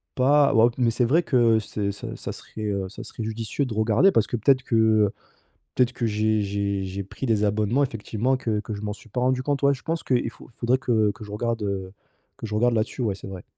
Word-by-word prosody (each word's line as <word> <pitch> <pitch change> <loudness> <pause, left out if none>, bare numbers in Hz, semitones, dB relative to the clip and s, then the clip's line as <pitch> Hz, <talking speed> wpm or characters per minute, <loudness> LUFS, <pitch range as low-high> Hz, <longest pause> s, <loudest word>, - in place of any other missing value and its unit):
pas, 140 +2 +4
ouais 115 +1 +6
mais 120 -3 +2
c'est 120 +2 +1
vrai 160 +9 +3
que 120 -6 +3
c'est 100 -1 -3
ça 100 - -7
ça - - -6
serait, 110 - -10
heu, 100 -2 -2
ça 105 - -9
serait 115 - -7
judicieux 110 +5 -2
de 125 - -5
regarder 110 - +4
parce 110 - +2
que 120 - -2
peut-être 130 +4 +3
que, 120 - -1
heu, 110 -2 +4 0.6
peut-être 125 -1 +2
que 120 - -2
j'ai 110 0 +1
j'ai 100 -1 -1
j'ai 95 +1 -4
pris 115 +7 -6
des 110 -3 +2
abonnements 105 +6 +1
effectivement 115 +1 -1
que 110 -4 -1
que 110 0 -6
je 100 - -7
m'en 105 -1 -2
suis 110 - -13
pas 125 - -3
rendu 130 +1 +1
compte. 140 0 -1
Ouais, 140 0 +4
je 130 - -12
pense 165 0 -2
qu'il 125 -2 +1
faut - - -15
il - - -22
faudrait 125 +2 +1
que 110 -5 +2
que 110 - -11
je 105 - -11
regarde, 115 +1 -2
heu, 95 -2 -3 0.4
que - - -6
je 105 - -5
regarde 120 +2 +2
là-dessus, 110 +4 -1
ouais, 105 -4 0
c'est 95 - -10
vrai. 95 -2 -8
110 Hz, 250 wpm, -24 LUFS, 105-125 Hz, 0.6 s, ouais